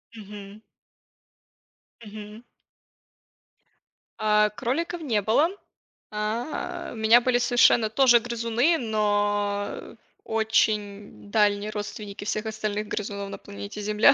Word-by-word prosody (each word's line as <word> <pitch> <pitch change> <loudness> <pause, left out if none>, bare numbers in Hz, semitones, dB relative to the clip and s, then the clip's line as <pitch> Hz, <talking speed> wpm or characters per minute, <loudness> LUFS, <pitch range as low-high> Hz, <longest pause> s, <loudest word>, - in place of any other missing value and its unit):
Мгм. 205 -1 -10 1.4
Мгм. 210 +1 -10 1.8
А, 210 0 +3
кроликов 270 - -3
не 230 -9 0
было. 235 - +3 0.6
А, 215 +6 -4
у - - -9
меня 225 +2 +5
были 245 0 +2
совершенно 240 -2 +4
тоже 240 +1 +5
грызуны, 235 +6 +1
но, 205 -2 0
э, - - -9 0.3
очень 210 -2 -1
дальние 205 -1 +2
родственники 210 -1 -6
всех 215 +1 -2
остальных 215 -1 -3
грызунов 200 -1 -4
на - - -7
планете 205 +1 -8
Земля 210 +3 +5
215 Hz, 100 wpm, -25 LUFS, 205-230 Hz, 1.8 s, меня